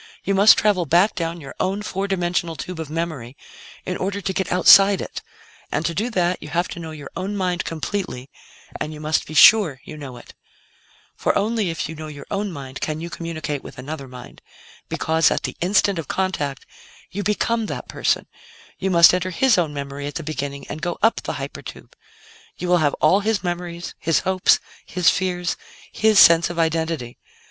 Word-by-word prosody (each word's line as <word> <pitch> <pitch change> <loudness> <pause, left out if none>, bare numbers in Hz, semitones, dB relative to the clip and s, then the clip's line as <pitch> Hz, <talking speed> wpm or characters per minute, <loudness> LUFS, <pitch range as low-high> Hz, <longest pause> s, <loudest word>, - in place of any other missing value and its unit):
You 200 - 0
must 200 +3 +7
travel 195 -6 +2
back 180 +8 +4
down 170 0 -3
your 140 - -9
own 195 +2 -1
four 195 0 -3
dimensional 175 -3 -1
tube 180 +1 -7
of 160 -2 -5
memory 155 -6 -4 0.5
in 180 - -3
order 200 +2 -2
to 190 -1 -3
get 190 - -2
outside 195 +2 +7
it, - - -6 0.5
and 150 - -1
to 170 - 0
do 215 +8 -1
that, 180 -5 0
you 150 - -8
have 175 +4 0
to - - -7
know 165 -1 -7
your 150 -3 -9
own 200 +2 -3
mind 180 -2 -1
completely, 165 -5 -4 0.5
and 150 - -3
you - - -10
must 155 +1 -1
be 155 - -8
sure 170 -4 +7
you 155 - -9
know 135 -5 -8
it. - - -14 0.8
"For - - 0
only 215 -1 0
if 165 - -3
you 160 - -7
know 155 0 -8
your 145 -2 -9
own 200 0 -2
mind 135 -4 -8
can 155 0 -2
you 170 +1 -6
communicate 155 -4 -5
with - - -11
another 140 +2 -7
mind. 125 -1 -12 0.5
Because, 160 -1 +2
at - - -1
the - - -4
'instant' 190 0 +2
of 160 - -6
contact, 150 -8 -2 0.5
you 205 - -3
become 220 +2 0
that - - -6
person; - - 0 0.5
you 190 - -1
must 170 -2 +7
enter 180 0 0
his 235 +7 +3
own 170 -4 +1
memory 140 0 -5
at 145 - -7
the 165 - -4
beginning 140 -2 -5
and 155 - -7
go 175 - -2
up 225 - +3
the - - -4
hyper - - -6
tube. - - -11 0.6
You 180 - -4
will 180 - +5
have 145 -3 +1
all 180 +6 +3
his 210 0 -1
memories, 175 -1 -4
his 165 -1 +1
hopes, 190 -1 +3 0.3
his 180 -1 +2
fears, 180 -2 -2 0.3
his 220 -1 +2
sense 170 -1 +7
of 175 - -6
identity. 160 -6 -1
170 Hz, 200 wpm, -22 LUFS, 155-190 Hz, 0.8 s, must